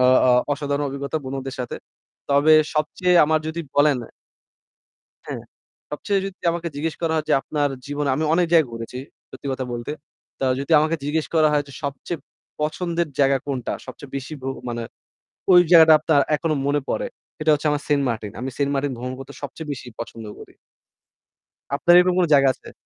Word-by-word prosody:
অ - - +5 0.2
অ্যাঁ 125 -1 +5
অসাধারণ 145 0 -2
অভিজ্ঞতা, 140 +3 -3
বন্ধুদের 135 0 -5
সাথে। 125 - -4 0.5
তবে 145 +3 +5 0.2
সবচেয়ে 165 +4 +1
আমার 155 +1 +2
যদি 160 +2 -3 0.2
বলেন 145 -1 +5 1.3
হ্যাঁ। - - -5 0.5
সবচেয়ে 195 +7 -1
যদি 195 0 -7
আমাকে 170 0 -3
জিজ্ঞেস 155 +2 -2
করা 165 -1 0
হয় 155 -1 -1
যে,'আপনার 145 +1 +1 0.2
জীবনে 145 0 -2
"আমি 155 - -1
অনেক 175 +1 +3
জায়গায় 160 -7 +5
ঘুরেছি 115 +2 -6 0.3
সত্যি 130 +1 -9
কথা 130 -1 -3
বলতে। 120 +3 -4 0.5
তা - - 0
যদি 140 +4 -5
আমাকে 155 +2 +1
জিজ্ঞেস 150 +2 0
করা 155 -1 +5
হয় 145 -1 +2
যে, - - -12
"সবচেয়ে 140 +4 -4 0.4
পছন্দের 170 +2 -1
জায়গা 135 0 +4
কোনটা? 130 -4 -3
সবচেয়ে 130 +1 -10
বেশী 140 +3 -5
ভ্র 135 - -3 0.2
মানে 120 -1 -3 0.7
ওই 180 - +9
জায়গাটা 160 -2 +8
আপনার 155 -2 +3 0.2
এখনো 155 0 -1
মনে 145 +1 +2
পড়ে - - -1 0.3
"সেটা 155 0 +1
হচ্ছে 150 +1 +1
আমার, 145 0 -1
'সেন্টমার্টিন।' 120 -8 -1
আমি 130 +1 -3
সেন্টমার্টিন 140 -1 0
ভ্রমণ 125 +2 -5
করতে 135 - -9
সবচেয়ে 150 +2 -7
বেশি 130 -2 -7
পছন্দ 115 -1 -7
করি। - - -13 1.2
আপনার 175 +4 +5
এরকম 180 0 +3
কোনো 180 -2 +3
জায়গা 140 -1 +6
আছে? - - -14
145 Hz, 170 wpm, -22 LUFS, 135-160 Hz, 1.3 s, ওই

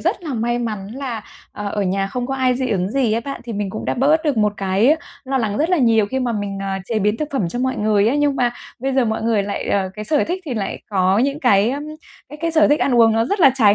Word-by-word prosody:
rất - - -1
là 300 -6 -4
may 240 +1 0
mắn 215 -5 -4
là, 255 -5 -4 0.3
ờ, 205 -1 -5
ở 205 - -1
nhà 195 +1 0
không 245 +4 -4
có 270 - -2
ai 255 -1 +2
dị 255 0 -2
ứng 190 -1 0
gì 255 -5 +1
ấy 230 - +1
bạn, 275 +4 -6
thì 235 - -5
mình 205 -2 -3
cũng 215 - -6
đã - - -1
bớt 300 +5 +2
được 290 -4 +1
một 210 -1 +2
cái 200 +10 +2 0.3
lo 265 0 -1
lắng 215 -4 -1
rất 320 +4 +1
là 365 - +4
nhiều 225 -4 +3
khi 265 +5 -2
mà 245 -2 -1
mình, 205 -2 -3
à, 195 -1 -2
chế 225 +2 -1
biến 210 +1 +1
thực 300 +4 -3
phẩm 250 -11 0
cho 240 - -4
mọi 260 +1 -1
người 210 0 +2
á. 250 - +1
Nhưng 290 -1 +1
mà 245 -1 +2 0.3
bây 270 +2 -2
giờ 260 -2 +3
mọi 220 -1 -2
người 225 -2 +2
lại 200 0 -4
ờ, 195 -2 +1
cái 210 - -6
sở 295 +6 +2
thích 365 +3 -3
thì 275 -6 -4
lại 200 -3 -4
có 190 +1 +2
những 280 +4 0
cái, 210 -3 +4
ơm, 280 +2 -3 0.5
cái 295 - -9
cái 335 - 0
sở 315 -2 +4
thích 295 - +3
ăn 265 - +2
uống 230 -2 +5
nó 225 +1 +2
rất 400 - -1
là 275 - +8
trái 210 -6 +5
235 Hz, 295 wpm, -20 LUFS, 205-270 Hz, 0.5 s, là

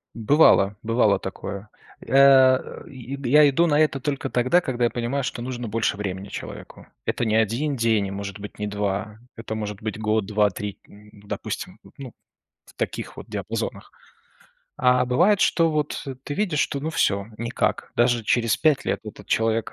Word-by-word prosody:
Бывало, 110 -4 +4
бывало 110 -3 +3
такое. 100 +2 -7 0.4
Э, 130 0 +5
я 140 +2 +2
иду 165 +5 +2
на 150 -2 +2
это 150 -3 +2
только 135 -1 -3
тогда, 130 +9 +2
когда 125 -5 -2
я - - +2
понимаю, 125 +3 -2
что 120 - -4
нужно 120 -1 -5
больше 110 -1 -1
времени 100 -1 -4
человеку. - - -9 0.2
Это 120 - -1
не 110 -1 +1
1 115 +7 +1
день 115 -4 +1
и, 95 - -6
может 100 0 -6
быть, 105 +1 -10
не 105 - -2
2. 105 +1 -3 0.2
Это 115 -1 -6
может 105 -1 -5
быть 110 -1 -4
год, 110 -1 0
2, 105 -1 +2
3, 100 +1 -6
допустим, 105 0 -8 0.2
ну, 135 -4 -8 0.5
в - - -18
таких - - -4
вот - - -9
диапазонах. - - -5 0.9
А 125 0 +4
бывает, 190 +12 +3
что 165 -1 +3
вот 150 -1 -2 0.2
ты 145 - -4
видишь, 180 -7 0
что, 140 -2 -1
ну 155 - -3
всё, 100 -10 +1
никак. 115 -2 -2
Даже 120 -2 +2
через 115 -1 +2
5 155 -4 +2
лет - - -1
этот 105 - -10
человек 115 0 0
115 Hz, 165 wpm, -23 LUFS, 105-135 Hz, 0.9 s, Э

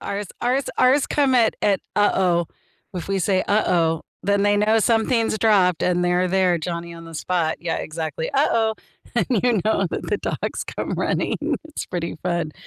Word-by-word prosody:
Ours 200 +1 -4
ours 255 +3 +1
ours 260 +2 +4
come 275 -3 +2
at 230 -3 +4
at, 200 -3 +2
"Uh-oh." 185 -4 +2 0.5
If 180 -1 -5
we 195 0 0
say, 185 +1 +1
"uh-oh," 170 -6 +1 0.2
then 200 +1 +1
they 205 0 +3
know 215 +2 +3
something's 225 0 +1
dropped, 190 -6 +3
and 180 0 +1
they're 180 +1 +2
there, 185 -2 +2
Johnny 170 +1 -5
on 165 0 -10
the 165 0 -11
spot. 165 0 -1
Yeah, 170 -1 -2
exactly. 160 0 -4
"Uh-oh." 230 -6 +2 0.4
And - - +1
you 235 -3 +2
know 220 - +2
that - - -4
the - - 0
dogs - - -3
come - - -5
running. - - -1 0.3
It's 310 -1 -6
pretty 170 -3 -4
fun. 170 -4 -1
190 Hz, 175 wpm, -22 LUFS, 170-220 Hz, 0.5 s, ours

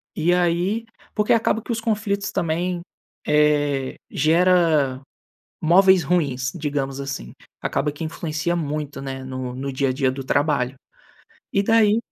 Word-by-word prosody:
E 170 +2 +2
aí 180 +5 +1 0.3
porque 210 -1 +3
acaba 225 -1 +2
que - - -6
os 225 -1 -2
conflitos 205 -2 -1
também, 175 0 -1 0.5
eh, 145 -3 +2 0.2
gera 160 -5 +3 0.6
móveis 185 +2 +5
ruins, 135 -6 0
digamos 140 -3 -2
assim, 135 - -5 0.3
acaba 150 +1 -1
que 150 +3 -7
influencia 160 +1 -2
muito, 150 -3 -3
né, 135 -1 -5
no 130 -1 -5
no 135 +2 -4
dia 135 +1 0
a 130 - 0
dia 130 -1 +1
do 135 0 -6
trabalho. 140 -2 +1 0.8
E 200 - +2
daí 220 0 +4
155 Hz, 140 wpm, -22 LUFS, 135-180 Hz, 0.8 s, móveis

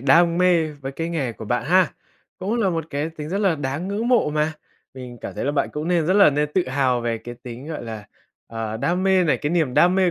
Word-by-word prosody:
đam 170 +6 +4
mê 180 -3 +4
với 140 -2 -7
cái 165 +4 -3
nghề 145 -8 -2
của 110 - -9
bạn 120 +3 -1
ha, 185 +2 +3 0.5
cũng 195 +5 -2
là 195 -4 +2
một 165 -3 -2
cái 145 +3 -2
tính 155 -2 -8
rất 195 - -1
là 195 -5 +2
đáng 145 +4 -3
ngưỡng 215 +4 -2
mộ 240 -11 +3
mà, 150 +1 0 0.4
mình 125 -2 -9
cảm - - -6
thấy - - -3
là 145 - 0
bạn 145 - 0
cũng 150 +2 -3
nên 170 -3 +2
rất 185 - +2
là 200 -6 +7
nên 150 +1 0
tự 180 -7 +1
hào 130 -2 +1
về 115 -1 -2
cái 120 +2 -9
tính, 125 +2 -8
gọi 155 -4 -5
là, 110 -3 -7 0.4
ờ, 110 -1 -4
đam 175 +10 0
mê 190 -1 +4
này, 150 -6 +2
cái 145 +4 -3
niềm 160 -7 +1
đam 180 +1 +5
mê 185 -2 +3
150 Hz, 260 wpm, -22 LUFS, 130-180 Hz, 0.5 s, là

